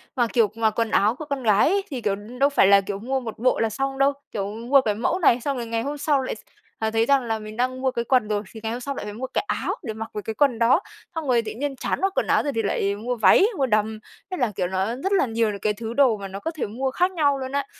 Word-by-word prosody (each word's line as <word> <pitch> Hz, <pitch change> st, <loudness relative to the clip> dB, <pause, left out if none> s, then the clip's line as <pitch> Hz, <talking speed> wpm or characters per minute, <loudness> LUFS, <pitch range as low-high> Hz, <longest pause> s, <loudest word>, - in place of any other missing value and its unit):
Mà, 240 Hz, -3 st, +2 dB
kiểu, 220 Hz, -4 st, +3 dB
mà 225 Hz, -1 st, +2 dB
quần 225 Hz, +1 st, -2 dB
áo 215 Hz, +4 st, +3 dB
của 310 Hz, -, -7 dB
con 280 Hz, -3 st, -4 dB
gái 215 Hz, +4 st, +4 dB
ấy, 395 Hz, +2 st, +1 dB
thì, 255 Hz, -4 st, -4 dB
kiểu, 200 Hz, -2 st, 0 dB
đâu 250 Hz, +7 st, -1 dB
phải 280 Hz, -8 st, +4 dB
là, 200 Hz, 0 st, +6 dB
kiểu, 195 Hz, 0 st, -5 dB
mua 265 Hz, +5 st, -1 dB
một 230 Hz, -4 st, -7 dB
bộ 255 Hz, +2 st, +2 dB
là 225 Hz, -, +1 dB
xong 270 Hz, +5 st, -3 dB
đâu. 275 Hz, +1 st, +3 dB, 0.2 s
Kiểu 195 Hz, -2 st, -2 dB
mua 250 Hz, +5 st, +3 dB
cái 210 Hz, -4 st, -1 dB
mẫu 330 Hz, -, 0 dB
này 250 Hz, -8 st, +4 dB
xong 280 Hz, +1 st, -2 dB
rồi 235 Hz, -, -3 dB
ngày 225 Hz, 0 st, -1 dB
hôm 290 Hz, +4 st, -4 dB
sau 285 Hz, -1 st, +1 dB
là -, -, -4 dB
lại, -, -, -3 dB, 0.4 s
à, 220 Hz, 0 st, -1 dB
thấy 225 Hz, +1 st, +2 dB
rằng 275 Hz, 0 st, +3 dB
là 225 Hz, -1 st, -2 dB
mình 215 Hz, 0 st, -9 dB
đang 255 Hz, +1 st, -1 dB
mua 265 Hz, -, +1 dB
cái 235 Hz, -2 st, -3 dB
quần 250 Hz, -3 st, +2 dB
rồi, 210 Hz, 0 st, -1 dB
thì 220 Hz, -, -9 dB
ngày 220 Hz, -, -2 dB
hôm 245 Hz, +2 st, -4 dB
sau 280 Hz, +1 st, -4 dB
lại -, -, -5 dB
phải 210 Hz, -, -6 dB
mua 250 Hz, +5 st, -5 dB
cái -, -, -1 dB
áo -, -, -1 dB
để 225 Hz, -6 st, -4 dB
mặc 220 Hz, +1 st, -6 dB
với 210 Hz, -, -5 dB
cái 220 Hz, -, -4 dB
quần 250 Hz, -2 st, +2 dB
đó. 235 Hz, +8 st, +4 dB, 0.4 s
Xong 320 Hz, -3 st, -3 dB
rồi 245 Hz, -2 st, +3 dB
tự 215 Hz, -1 st, -6 dB
nhiên 280 Hz, +3 st, -3 dB
chán 260 Hz, -, -3 dB
mặc 390 Hz, 0 st, +1 dB
quần -, -, +1 dB
áo -, -, +3 dB
rồi 285 Hz, -, -2 dB
thì 225 Hz, -, +1 dB
lại 200 Hz, 0 st, 0 dB
mua 245 Hz, +4 st, -3 dB
váy, 230 Hz, -, +6 dB
mua 270 Hz, -, +2 dB
đầm. 215 Hz, -1 st, 0 dB, 0.3 s
Thế 370 Hz, -, -3 dB
là, 245 Hz, -6 st, 0 dB
kiểu, 180 Hz, -2 st, 0 dB
nó 190 Hz, +1 st, -1 dB
rất 370 Hz, +9 st, -3 dB
là 390 Hz, -7 st, +3 dB
nhiều 225 Hz, -2 st, 0 dB
những 200 Hz, -, -6 dB
cái 210 Hz, +2 st, 0 dB
thứ 225 Hz, +1 st, -6 dB
đồ 260 Hz, -5 st, +4 dB
mà 200 Hz, -1 st, -6 dB
nó 195 Hz, +1 st, -7 dB
có 325 Hz, -, -3 dB
thể 315 Hz, -, -3 dB
mua 260 Hz, +6 st, -2 dB
khác 360 Hz, +7 st, +1 dB
nhau 290 Hz, -6 st, +2 dB
luôn 260 Hz, 0 st, -5 dB
á. 280 Hz, -1 st, -1 dB
235 Hz, 315 wpm, -24 LUFS, 215-275 Hz, 0.4 s, là